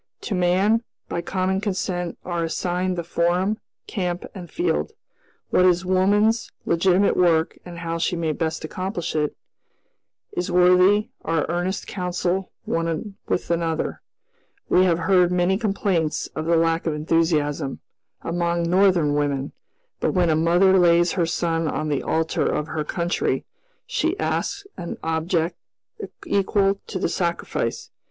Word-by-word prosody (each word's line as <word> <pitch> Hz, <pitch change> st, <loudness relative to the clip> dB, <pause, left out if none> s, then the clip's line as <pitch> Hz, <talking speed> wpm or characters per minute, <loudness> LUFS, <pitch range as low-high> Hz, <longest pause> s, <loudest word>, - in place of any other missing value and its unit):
To -, -, -4 dB
man, 190 Hz, +5 st, +2 dB, 0.3 s
by 170 Hz, -, -2 dB
common 190 Hz, +2 st, -1 dB
consent, 185 Hz, -4 st, -2 dB
are 175 Hz, -2 st, -1 dB
assigned 180 Hz, +2 st, -1 dB
the 170 Hz, -, -2 dB
forum, 175 Hz, +5 st, 0 dB, 0.3 s
camp, 180 Hz, -3 st, -3 dB
and 180 Hz, -4 st, -9 dB
field. 350 Hz, +2 st, -1 dB, 0.6 s
What 180 Hz, -, +4 dB
is 180 Hz, 0 st, +3 dB
woman's 205 Hz, +5 st, +2 dB
legitimate 185 Hz, +3 st, +3 dB
work 165 Hz, -3 st, +2 dB
and 175 Hz, -1 st, -8 dB
how 165 Hz, -1 st, -3 dB
she 175 Hz, -, 0 dB
may 165 Hz, -2 st, -1 dB
best 160 Hz, 0 st, -2 dB
accomplish 185 Hz, 0 st, -4 dB
it, 150 Hz, -1 st, 0 dB, 1.0 s
is 180 Hz, +1 st, -2 dB
worthy 180 Hz, +3 st, +5 dB
our 165 Hz, -2 st, 0 dB
earnest 175 Hz, +3 st, -1 dB
counsel 180 Hz, 0 st, -2 dB
one 165 Hz, +4 st, -2 dB
with 175 Hz, -, -1 dB
another. 165 Hz, -1 st, -1 dB, 0.7 s
We 185 Hz, -, +5 dB
have 170 Hz, -3 st, +3 dB
heard 180 Hz, 0 st, +3 dB
many 180 Hz, +1 st, +2 dB
complaints 195 Hz, -6 st, 0 dB
of 155 Hz, -, -3 dB
the 170 Hz, -, +4 dB
lack 165 Hz, 0 st, +1 dB
of 155 Hz, -, 0 dB
enthusiasm, 150 Hz, -3 st, 0 dB, 0.4 s
among 170 Hz, 0 st, 0 dB
Northern 180 Hz, -4 st, +3 dB
women; 145 Hz, -2 st, -1 dB, 0.5 s
but -, -, 0 dB
when 175 Hz, -3 st, +3 dB
a -, -, +3 dB
mother 175 Hz, +4 st, +4 dB
lays 175 Hz, -1 st, +4 dB
her 170 Hz, -3 st, 0 dB
son 165 Hz, -1 st, 0 dB
on 155 Hz, 0 st, -2 dB
the 145 Hz, -2 st, 0 dB
altar 160 Hz, 0 st, 0 dB
of 150 Hz, -, -1 dB
her 155 Hz, -1 st, -2 dB
country, 170 Hz, +3 st, -1 dB, 0.4 s
she 370 Hz, -6 st, -1 dB
asks 400 Hz, 0 st, -2 dB
an 170 Hz, -, -5 dB
object 165 Hz, +1 st, 0 dB, 0.7 s
equal 195 Hz, 0 st, +2 dB
to 195 Hz, -, -4 dB
the 185 Hz, -, 0 dB
sacrifice. 170 Hz, -2 st, -2 dB
175 Hz, 140 wpm, -23 LUFS, 165-185 Hz, 1.0 s, worthy